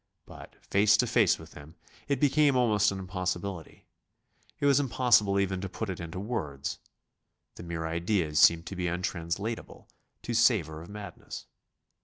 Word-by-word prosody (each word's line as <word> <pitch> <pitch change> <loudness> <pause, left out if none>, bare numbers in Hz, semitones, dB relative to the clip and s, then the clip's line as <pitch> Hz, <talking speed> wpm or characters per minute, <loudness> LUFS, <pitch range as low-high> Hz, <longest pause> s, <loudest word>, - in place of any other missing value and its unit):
But, - - -13
face 105 +2 +4
to 125 - +2
face 115 -5 +3
with 80 0 -13
him, 75 +3 -13 0.3
it 140 -3 0
became 145 0 +3
almost 105 -5 +3
an 100 - -4
impossibility. 90 -2 -5 0.7
It - - -1
was 140 -1 +5
impossible 115 -7 +3
even 95 -1 -1
to 95 - -4
put 100 +2 -4
it 90 - -7
into 85 +1 -6
words. 95 - -4 0.7
The - - -11
mere 85 -1 -4
ideas 85 -1 0
seemed 85 0 +5
to 95 - -7
be 90 -1 -2
untranslatable, 90 +5 -4 0.4
to 120 - -3
savour 100 -10 +2
of 85 - -12
madness. 100 -3 -9
95 Hz, 155 wpm, -29 LUFS, 85-110 Hz, 0.7 s, was